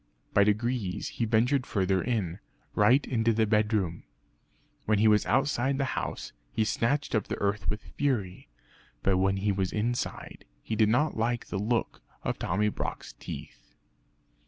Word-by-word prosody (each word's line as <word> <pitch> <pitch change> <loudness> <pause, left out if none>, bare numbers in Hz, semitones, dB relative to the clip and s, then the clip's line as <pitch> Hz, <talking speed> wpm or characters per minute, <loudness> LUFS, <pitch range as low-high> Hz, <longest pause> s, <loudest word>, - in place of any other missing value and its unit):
By 100 - +6
degrees 105 -2 0
he 115 - -2
ventured 120 +4 +2
further 95 -2 +1
in 100 -7 -2 0.3
right 120 +7 +4
into 115 -2 +1
the 110 0 +2
bedroom. 105 -5 +1 0.9
When 110 0 +3
he 110 +2 +4
was 105 -1 +4
outside 135 +1 +1
the 140 - +1
house, - - -4 0.2
he 110 -1 +1
scratched 140 +7 0
up 110 -3 +1
the - - -3
earth 100 +1 -1
with 105 0 -3
fury. 105 - -2 0.5
But 95 -1 +3
when 95 +1 +2
he 100 +1 +1
was 95 -2 -1
inside 120 +3 -3 0.2
he 110 - -3
did 110 -1 +4
not 135 +6 +2
like 120 +1 -1
the 95 - -2
look 115 +3 -1 0.2
of - - -2
Tommy 105 +4 +1
Brock's - - -5
teeth. - - -9
110 Hz, 160 wpm, -28 LUFS, 100-120 Hz, 0.9 s, By